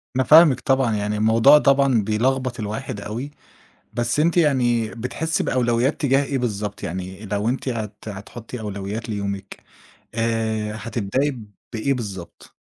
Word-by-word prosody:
أنا 130 - +3
فاهمِك 155 -2 +7
طبعًا، 130 -5 +1
يعني 105 0 -1
الموضوع 115 +7 +6
طبعًا 140 -5 +3
بيلخبط 125 +3 0
الواحد 110 +1 -4
أوي، 120 +8 -5 0.6
بس 120 +4 0
أنتِ 170 +3 +2
يعني 120 -8 +2
بتحسّي 155 +7 -2
بأولويّات 120 +3 +1
تجاه 135 0 +3
إيه 135 0 -2
بالضبط، 105 -4 -3
يعني 95 +4 -5
لو 105 +3 -1
أنتِ 130 +1 -2
هت 110 -3 -4
هتحُطّي 115 +4 -8
أولويّات 105 +2 -5
ليومِك، 100 -2 -5 0.5
آآ، 110 -2 -1
هتبدئي 115 +5 -2 0.3
بإيه 125 +5 0
بالضبط؟ 100 -8 -8
115 Hz, 135 wpm, -22 LUFS, 105-130 Hz, 0.6 s, فاهمِك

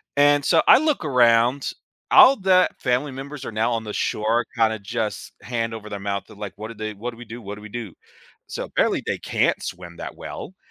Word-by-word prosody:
and 145 0 +4
so 165 +2 +4
I - - +9
look 305 - 0
around. 125 0 +3 0.4
All 270 0 +8
the 185 -1 +4
family 125 +3 0
members 140 +1 -8
are - - -5
now 115 +2 0
on 115 - -2
the 105 - -6
shore 115 +3 0
kinda 110 -1 +2
just 110 +1 -4
hand 115 -2 -3
over 105 -1 -8
their 100 - -5
mouth 100 0 -3
to - - -14
like, 105 -1 -7
what 110 +1 -7
do 115 - -7
they 110 0 -5
"What 115 +5 -5
do 115 - -15
we 120 - -10
do, 120 +2 -9
what 100 -1 -7
do 105 - -12
we 105 - -9
do?" 110 -4 -6 0.5
So - - -5
apparently, - - 0
they - - -1
can't - - 0
swim 85 -1 -7
that - - -7
well, 190 - -8
115 Hz, 225 wpm, -23 LUFS, 105-135 Hz, 0.5 s, I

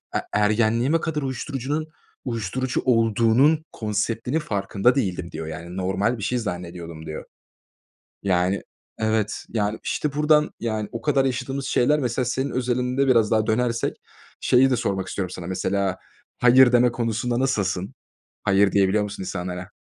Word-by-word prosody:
e - - +3
ergenliğime 115 +8 +2
kadar 150 -3 -2
uyuşturucunun 140 +3 -3 0.4
uyuşturucu 125 +2 -2
olduğunun 115 +6 +3
konseptinin 110 +6 -1
farkında 105 -2 +1
değildim, 90 -8 -2
diyor. 80 0 -6
Yani, 85 +3 -7
normal 95 +6 0
bir 105 - -7
şey 125 +3 0
zannediyordum, 85 -6 -6
diyor. 80 - -6 1.0
Yani, 95 0 +1 0.4
evet, 110 -1 0
yani, 105 -1 -1
işte, 150 -2 -2
buradan, 150 +1 +3
yani, 110 -2 -2
o 115 - -5
kadar 140 -1 +2
yaşadığımız 135 +1 -2
şeyler. 150 +3 +2
Mesela, 125 -1 -1
senin 130 +3 -1
özelinde 125 +2 0
biraz 115 -4 +4
daha 110 0 +2
dönersek 115 +1 0 0.4
şeyi 130 +2 +4
de 125 - +2
sormak 100 -5 -2
istiyorum 95 -2 -3
sana. 90 -2 -7
Mesela, 95 0 -1 0.4
hayır 125 +1 +6
deme 125 0 +4
konusunda 120 +1 -1
nasılsın? 100 -8 -1 0.5
Hayır 100 0 +3
diyebiliyor 100 +1 +3
musun 100 -2 -5
insanlara? 90 -1 -5
115 Hz, 140 wpm, -23 LUFS, 100-130 Hz, 1.0 s, hayır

